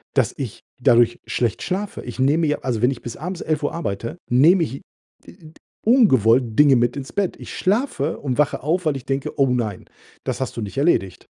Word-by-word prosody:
dass - - +2
ich - - -6 0.2
dadurch 120 0 +4
schlecht 120 -3 -1
schlafe. 195 +3 -3
Ich 120 - -8
nehme 150 +5 +3
ja 150 - +1
also, 120 -4 -2
wenn 125 +2 +3
ich 130 - -7
bis 120 - -7
abends 180 +3 -5
11:00 150 -2 -1
arbeite, 115 - -4
nehme 160 +9 +5
ich, 135 -4 -4 0.5
äh, - - -13
äh, - - -17
d 160 -4 -15 0.3
ungewollt 130 - +4
Dinge 145 -2 +6
mit 120 +2 +1
ins 135 -1 -7
Bett. 200 -3 -1
Ich - - -9
schlafe 195 - 0
und 135 -1 -3
wache 150 - +1
auf, 165 +3 0
weil 145 -3 +1
ich 130 - -11
denke: 135 0 -3
„Oh, 135 - +5
nein, 110 -6 -2 0.4
das - - -3
hast 130 - -4
du - - -2
nicht 105 +5 -8
erledigt.“ 95 - 0
135 Hz, 210 wpm, -21 LUFS, 120-165 Hz, 0.5 s, Dinge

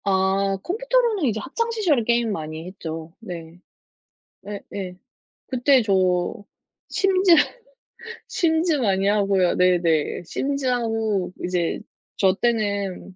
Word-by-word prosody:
아 195 0 +1
컴퓨터로는 470 -2 +1
이제 220 -4 0
학창 460 - -2
시절에 365 - +1
게임 235 0 +1
많이 155 -2 -5
했죠. 165 -3 -7
네. 170 -5 -9 0.8
네네. 195 -2 -7 0.5
그때 260 +1 +3
저 185 -4 +1 0.5
심즈, 380 -2 +4 0.9
심즈 330 0 +1
많이 195 -6 +1
하고요. 195 -3 +2
네네. 175 -4 +2
심즈하고 225 - -1
이제 175 -2 -1 0.4
저 190 -2 +4
때는 200 -4 -1
200 Hz, 205 characters per minute, -23 LUFS, 180-265 Hz, 0.9 s, 심즈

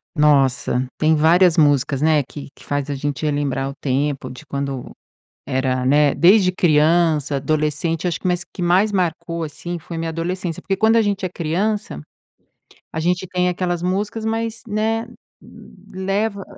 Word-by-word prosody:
Nossa, 135 -4 +2
tem 155 +1 +3
várias 170 +3 +4
músicas, 145 -2 +3
né, 155 -1 +4
que 140 +2 -10
que - - -17
faz 145 0 -2
a 145 - -2
gente 145 +1 -3
relembrar 140 -2 -1
o - - -7
tempo 140 +1 -1
de 130 +5 -11
quando 140 -3 -4 0.6
era 130 -1 -1
né, 145 +1 +4
desde 185 +1 +5
criança, 155 -3 +2
adolescente. 155 +3 -1
Eu - - +3
acho 170 - -2
que - - -4
o 180 0 0
que 180 - -5
mais 185 +5 +3
marcou, 170 -3 -2
assim, 170 +3 -6
foi 170 +1 -8
a - - -4
minha 165 0 -3
adolescência. 170 +1 -4
Porque 195 -1 -1
quando 220 +1 +4
a 225 - +5
gente 200 -2 -1
é - - -3
criança 185 - -2 0.9
a - - -4
gente 180 +3 0
tem 180 0 0
aquela 180 0 -1
música 200 +5 -1
mais, 225 0 -2
né, 220 +2 -1 0.9
leva 195 +2 -2
165 Hz, 165 wpm, -20 LUFS, 145-185 Hz, 0.9 s, desde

